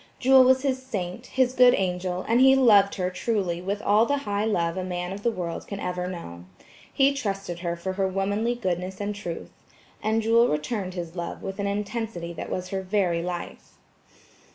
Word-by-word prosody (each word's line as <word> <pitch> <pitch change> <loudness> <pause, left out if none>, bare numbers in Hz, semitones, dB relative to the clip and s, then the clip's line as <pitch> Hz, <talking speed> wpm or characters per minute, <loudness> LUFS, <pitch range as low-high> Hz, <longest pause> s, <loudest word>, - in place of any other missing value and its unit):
Jewel 265 0 +6
was 260 +1 +4
his 260 -2 0
saint, 210 -2 -5
his 260 -1 +1
good 250 -1 +6
angel; 180 -1 -2
and 235 +3 +3
he 265 0 +7
loved 210 -7 +5
her 180 -1 -1
truly 180 -4 -1
with 200 +3 -3
all 215 +3 +4
the 285 - +1
high 205 0 0
love 170 -6 0
a 185 - -3
man 180 0 -4
of 200 - -7
the 235 - +2
world 175 -6 -5
can 200 - -6
ever 180 -1 -3
know. 90 - -8 0.5
He 275 0 +3
trusted 195 -9 -4
her 170 -1 -2
for 185 +2 -4
her 190 0 0
womanly 200 +5 -1
goodness 185 -4 -3
and 205 0 -2
truth. 175 -5 -6 0.5
And 220 +1 +1
Jewel 230 +2 +4
returned 185 +4 -2
his 170 -1 -6
love 175 -1 -5
with 195 +1 -5
an 200 - -1
intensity 205 -3 -3
that - - -6
was 185 0 -4
her 195 0 -2
very 185 -3 0
life. 175 0 -6
195 Hz, 195 wpm, -25 LUFS, 180-225 Hz, 0.5 s, he